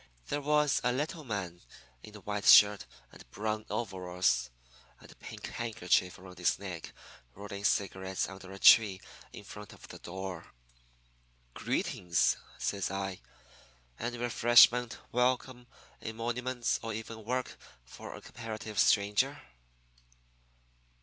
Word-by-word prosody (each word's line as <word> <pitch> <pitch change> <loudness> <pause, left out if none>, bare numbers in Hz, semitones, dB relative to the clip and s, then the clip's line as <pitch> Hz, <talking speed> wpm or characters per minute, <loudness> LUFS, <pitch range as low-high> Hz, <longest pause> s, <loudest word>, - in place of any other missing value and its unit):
"There 145 - -1
was 150 0 +2
a 125 - +2
little 150 +5 -3
man 95 -8 -5 0.4
in 105 0 -13
a 105 - -11
white 105 0 -4
shirt 105 -1 +7 0.2
and - - -15
brown 110 - -3
overalls 90 - -1 0.5
and - - -15
a - - -16
pink - - -9
handkerchief 100 -5 0
around 90 -2 -13
his 90 - +2
neck 90 -4 -7 0.4
rolling 100 0 -8
cigarettes 95 -1 0
under 95 -1 -10
a 95 - -8
tree 100 -2 +6 0.3
in - - -10
front - - -10
of - - -14
the - - -10
door. 95 -1 -7 1.0
"'Greetings,' 85 -1 0 0.2
says 100 -1 -2
I. 95 -1 -4 0.8
'Any 120 +1 -3
refreshment, 120 0 +5
welcome, 125 0 0 0.3
emoluments, 120 +2 -2
or 115 -1 -4
even 110 0 -7
work 125 +3 -3 0.3
for - - -10
a - - -11
comparative 110 -2 -6
stranger?' 105 +9 +3
105 Hz, 125 wpm, -31 LUFS, 95-120 Hz, 1.0 s, shirt